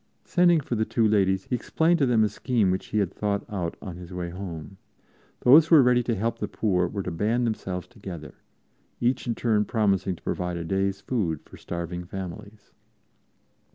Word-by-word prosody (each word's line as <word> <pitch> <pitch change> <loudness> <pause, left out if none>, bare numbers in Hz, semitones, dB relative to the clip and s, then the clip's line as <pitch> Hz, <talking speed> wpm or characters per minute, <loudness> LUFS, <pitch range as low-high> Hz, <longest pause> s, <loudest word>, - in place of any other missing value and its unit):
Sending 175 -2 +4
for 135 - -5
the 110 -1 +1
two 110 0 +1
ladies, 95 -2 +2
he 125 - -2
explained 165 +7 +1
to 140 - +3
them 115 -3 +4
a - - +4
scheme 110 -3 0
which 95 - -2
he 110 - -2
had 100 -3 0
thought 100 -1 -1
out 95 -7 -4
on 90 -4 -7
his 90 0 -10
way 90 -1 -4
home. 90 -2 -7 0.6
Those 150 +6 +7
who 165 - +6
were 145 - +8
ready 125 0 +4
to 120 -1 -1
help 115 +3 -2
the 105 - -2
poor 90 -4 0
were 100 +2 -4
to 90 - -4
band 110 +8 0
themselves 95 -5 -3
together, 95 -9 -9 0.7
each 125 +1 0
in 115 - 0
turn 110 -3 +2
promising 100 -4 +1
to - - -20
provide 90 -1 -2
a 85 - -4
day's 95 +3 -1
food 90 - -1
for - - -14
starving 85 +1 -5
families. 95 +3 -8
100 Hz, 195 wpm, -26 LUFS, 90-115 Hz, 0.7 s, were